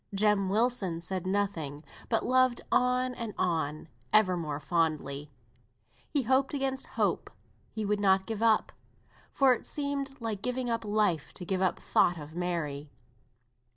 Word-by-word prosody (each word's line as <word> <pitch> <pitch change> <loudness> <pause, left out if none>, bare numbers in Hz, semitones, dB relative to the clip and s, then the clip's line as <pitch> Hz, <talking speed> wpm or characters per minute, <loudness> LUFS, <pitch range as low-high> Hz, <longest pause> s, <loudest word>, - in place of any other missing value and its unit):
Jem 200 -1 +2
Wilson 210 -5 +1
said 185 +1 -4
nothing, 175 -7 -2 0.3
but 225 - +1
loved 255 -1 +3
on 250 0 +2
and 230 -4 -5
on, 160 -3 -1 0.2
ever 210 -4 +5
more 150 -4 -3
fondly; 150 -3 -1 0.8
he 285 -3 +1
hoped 265 +4 +2
against 270 -1 -2
hope; - - +1 0.4
he 220 -1 -4
would 205 0 +1
not 190 -1 +3
give 220 0 -4
up, 225 -2 +3 0.6
for 270 -2 +4
it 245 - -5
seemed 280 -2 -3
like 220 -4 -3
giving 250 0 -2
up 230 0 -1
life 205 -7 0
to 180 - -5
give 185 +1 -1
up 185 - +2
thought 175 - +2
of 150 0 -9
Mary. 160 -5 -3
205 Hz, 150 wpm, -30 LUFS, 170-245 Hz, 0.8 s, ever